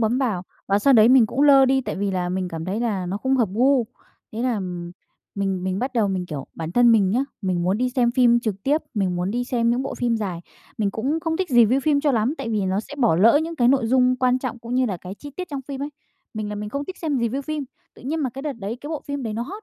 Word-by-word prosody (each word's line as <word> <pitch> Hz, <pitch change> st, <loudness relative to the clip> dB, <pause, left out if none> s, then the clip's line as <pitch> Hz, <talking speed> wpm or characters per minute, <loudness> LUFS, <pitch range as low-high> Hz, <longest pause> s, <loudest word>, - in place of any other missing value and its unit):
bấm 230 Hz, +3 st, +1 dB
vào 220 Hz, -10 st, -1 dB, 0.2 s
và 200 Hz, +1 st, +2 dB
sau 275 Hz, +6 st, +4 dB
đấy 225 Hz, -2 st, +7 dB
mình 250 Hz, -3 st, +6 dB
cũng 265 Hz, +6 st, -1 dB
lơ 275 Hz, -2 st, +7 dB
đi, 265 Hz, 0 st, +3 dB
tại -, -, -5 dB
vì 200 Hz, 0 st, -1 dB
là 180 Hz, -1 st, -1 dB
mình 185 Hz, 0 st, -2 dB
cảm 165 Hz, -1 st, -6 dB
thấy 200 Hz, +5 st, -2 dB
là 205 Hz, -6 st, -1 dB
nó 185 Hz, +3 st, -2 dB
không 265 Hz, +5 st, 0 dB
hợp 235 Hz, -6 st, +2 dB
gu. 255 Hz, +3 st, +3 dB, 0.5 s
Thế 225 Hz, +2 st, -3 dB
là, 250 Hz, -1 st, +1 dB
ừm, 180 Hz, -4 st, -5 dB, 0.4 s
mình 195 Hz, -2 st, -2 dB
mình 190 Hz, +1 st, -1 dB
bắt 255 Hz, +2 st, -2 dB
đầu 225 Hz, -5 st, +1 dB
mình, 185 Hz, -2 st, -2 dB
kiểu, 145 Hz, -5 st, -6 dB
bản 165 Hz, 0 st, -5 dB
thân 240 Hz, +1 st, +5 dB
mình 200 Hz, -4 st, +3 dB
nhá, 250 Hz, +6 st, +1 dB, 0.2 s
mình 185 Hz, -2 st, 0 dB
muốn 185 Hz, +5 st, +1 dB
đi 250 Hz, 0 st, 0 dB
xem 245 Hz, -2 st, +2 dB
phim 240 Hz, -1 st, +4 dB
trực 205 Hz, -4 st, -4 dB
tiếp, 295 Hz, +6 st, +1 dB
mình 190 Hz, -4 st, 0 dB
muốn 180 Hz, +2 st, -1 dB
đi 245 Hz, +3 st, -1 dB
xem 235 Hz, -2 st, +1 dB
những 245 Hz, +2 st, 0 dB
bộ 270 Hz, -, -4 dB
phim 240 Hz, -2 st, 0 dB
dài. 190 Hz, -6 st, -4 dB, 0.4 s
Mình 205 Hz, -2 st, +1 dB
cũng 270 Hz, +10 st, -2 dB
không 320 Hz, 0 st, -1 dB
thích 375 Hz, 0 st, -2 dB
review 240 Hz, +1 st, +5 dB
phim 285 Hz, 0 st, +2 dB
cho 290 Hz, -1 st, +2 dB
lắm 235 Hz, +4 st, +1 dB
tại 270 Hz, -, -4 dB
vì 215 Hz, -2 st, 0 dB
nó 190 Hz, +2 st, 0 dB
sẽ 255 Hz, -, -10 dB
bỏ 235 Hz, -11 st, +3 dB
lỡ 230 Hz, -, +5 dB
những 330 Hz, 0 st, -5 dB
cái 240 Hz, -1 st, +3 dB
nội 260 Hz, -3 st, +3 dB
dung 255 Hz, +1 st, +3 dB
quan 255 Hz, 0 st, +2 dB
trọng, 250 Hz, -2 st, -5 dB
cũng 235 Hz, +1 st, -6 dB
như 255 Hz, 0 st, +2 dB
là 195 Hz, -5 st, -2 dB
cái 180 Hz, +2 st, -9 dB
chi 290 Hz, +7 st, -10 dB
tiết 365 Hz, -1 st, -5 dB
trong 280 Hz, -4 st, -4 dB
phim 275 Hz, +1 st, -6 dB
ấy. 290 Hz, -, -4 dB, 0.4 s
Mình 215 Hz, -1 st, -4 dB
là 210 Hz, -, -4 dB
mình 210 Hz, 0 st, -5 dB
không 280 Hz, +6 st, -4 dB
thích 375 Hz, +5 st, -8 dB
xem 300 Hz, -5 st, -1 dB
review 235 Hz, +4 st, -1 dB
phim. 305 Hz, 0 st, -4 dB, 0.3 s
Tự -, -, -16 dB
nhiên 310 Hz, +5 st, -2 dB
mà 265 Hz, -, -1 dB
cái 270 Hz, +3 st, -8 dB
đợt 295 Hz, -1 st, -2 dB
đấy, 225 Hz, -1 st, -5 dB
cái 290 Hz, -, -7 dB
bộ 315 Hz, -2 st, -4 dB
phim 285 Hz, -1 st, -4 dB
đấy 225 Hz, -3 st, -3 dB
nó 230 Hz, -, -2 dB
hot, 395 Hz, -, -8 dB
235 Hz, 295 wpm, -23 LUFS, 200-270 Hz, 0.5 s, đấy